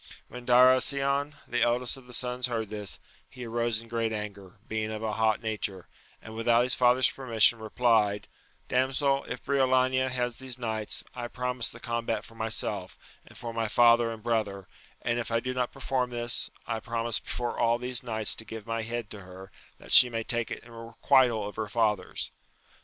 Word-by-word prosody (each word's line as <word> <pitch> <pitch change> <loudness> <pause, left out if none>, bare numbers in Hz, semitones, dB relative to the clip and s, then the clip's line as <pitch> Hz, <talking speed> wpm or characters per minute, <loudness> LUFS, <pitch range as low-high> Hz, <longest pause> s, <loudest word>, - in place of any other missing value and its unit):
When 125 -1 -10
Darasion, 135 +3 +4
the 120 - -1
eldest 120 +1 +3
of 130 -2 -12
the - - -12
sons 125 0 +1
heard 115 -3 -3
this, 105 -2 -3 0.3
he 125 -1 -9
arose 115 -1 0
in - - -16
great 115 -1 -1
anger, 105 -2 -6
being 110 0 -2
of 110 0 -5
a 110 -1 -1
hot 110 0 +1
nature, 100 -4 -3 0.4
and 110 - -9
without 115 +1 +3
his 125 - 0
father's 125 +1 +4
permission 115 -3 +3
replied, 110 -2 +1 0.4
Damsel, 135 +2 +1
if 125 - -6
Briolania 130 -1 +2
has 125 -2 -2
these 130 -2 -3
knights, 110 -3 -2
I 120 -1 -5
promise 125 -1 -2
the - - -12
combat 115 -2 -2
for - - -15
myself, 110 -1 -3 0.3
and - - -14
for 115 -1 -6
my 115 -1 -1
father 120 +1 +5
and 110 -2 -9
brother; 105 -5 -1 0.4
and, 120 0 0
if 120 - -3
I 115 0 +1
do 130 +2 -3
not 125 -1 -1
perform 130 -2 -1
this, 120 0 0 0.2
I 115 - -2
promise 115 -1 -2
before 120 -1 -4
all 115 0 +3
these 125 0 -1
knights 110 -4 +1
to - - -3
give 110 -1 -8
my 115 0 -2
head 115 0 -4
to 105 - -7
her, 95 +1 -12 0.3
that - - -10
she 125 - +9
may 115 -1 -3
take 120 0 -1
it - - -6
in 120 - -15
requital 115 -1 +2
of 105 - -9
her 110 - -2
father's. 105 -3 0
115 Hz, 190 wpm, -28 LUFS, 110-125 Hz, 0.4 s, she